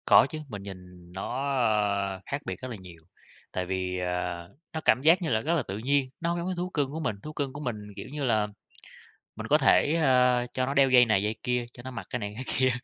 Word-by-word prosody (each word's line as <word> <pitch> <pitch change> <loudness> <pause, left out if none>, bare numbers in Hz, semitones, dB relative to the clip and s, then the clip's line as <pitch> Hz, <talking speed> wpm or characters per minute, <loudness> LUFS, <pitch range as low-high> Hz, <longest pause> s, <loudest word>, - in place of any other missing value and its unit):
Có - - +8
chứ, 155 - -5
mình 105 -6 -7
nhìn 90 -3 -11
nó, 130 +8 -3 0.7
a, - - -10
khác 140 +1 -3
biệt - - -3
rất 130 - -5
là 115 - -5
nhiều, 90 -3 -13 0.5
tại 90 - -2
vì, 90 0 -2
à, 90 -1 -2 0.3
nó 160 - -2
cảm 130 - +4
giác 165 +6 +5
như 170 - -1
là 110 -2 +2
rất 160 +8 0
là 155 - +1
tự 95 -2 -5
nhiên, 135 +3 +1
nó 170 - -1
hông 170 0 0
giống 170 - -3
cái 185 - -2
thú 180 +1 -2
cưng 145 -6 -1
của 160 - -4
mình, 155 -10 -1
thú 155 - -7
cưng 140 -3 -3
của 145 - -7
mình, 125 -5 -2 0.2
kiểu 100 - -7
như 145 -1 -4
là, 110 -5 +2 0.9
mình - - -6
có - - +5
thể, 150 - +4
ơ, 125 -5 +4
cho 130 - 0
nó 135 - -2
đeo 135 -1 +5
dây 125 -1 +7
này 110 -4 +2
dây 105 +1 -1
kia, 125 -1 0
cho 120 - -12
nó 130 - -6
mặc 115 -6 -6
cái 125 - -2
này 105 -2 -4
cái 125 - -5
kia, 130 0 +4
125 Hz, 260 wpm, -28 LUFS, 100-140 Hz, 0.9 s, Có